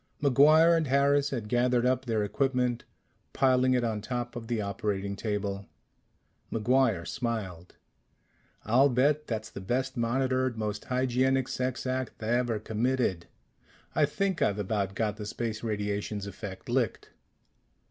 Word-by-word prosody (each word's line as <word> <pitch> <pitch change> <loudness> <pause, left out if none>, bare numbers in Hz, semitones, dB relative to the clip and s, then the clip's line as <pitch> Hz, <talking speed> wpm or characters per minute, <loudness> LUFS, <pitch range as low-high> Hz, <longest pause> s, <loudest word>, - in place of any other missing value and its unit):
MacGuire 155 +4 +6
and 160 -2 +1
Harris 140 +1 +3
had 120 -7 -4
gathered 125 +1 +2
up 130 0 +1
their 110 -3 0
equipment, 125 +2 0 0.5
piling 130 -1 +3
it 125 - +1
on 110 -2 -1
top 120 +2 -4
of 115 -2 -6
the 120 -1 -1
operating 100 -1 -2
table. 100 -2 -3 0.8
MacGuire 115 -5 +2
smiled. 100 -8 -4 0.9
"I'll 130 +6 +4
bet 145 +4 +2
that's 110 -1 -4
the 100 - -7
best 130 +6 -1
monitored, 130 +1 0
most 105 -1 -3
hygienic 130 +1 +1
sex 130 0 -3
act 130 0 -2
ever 120 0 +1
committed. 110 -4 -1 0.7
I - - +4
think 195 -3 -1
I've 100 - +2
about 100 -1 -2
got 105 -1 -1
the 105 - -6
space 110 0 -4
radiations 105 -1 -2
effect 100 -1 -8
licked." 120 -2 -1
120 Hz, 135 wpm, -29 LUFS, 105-130 Hz, 0.9 s, MacGuire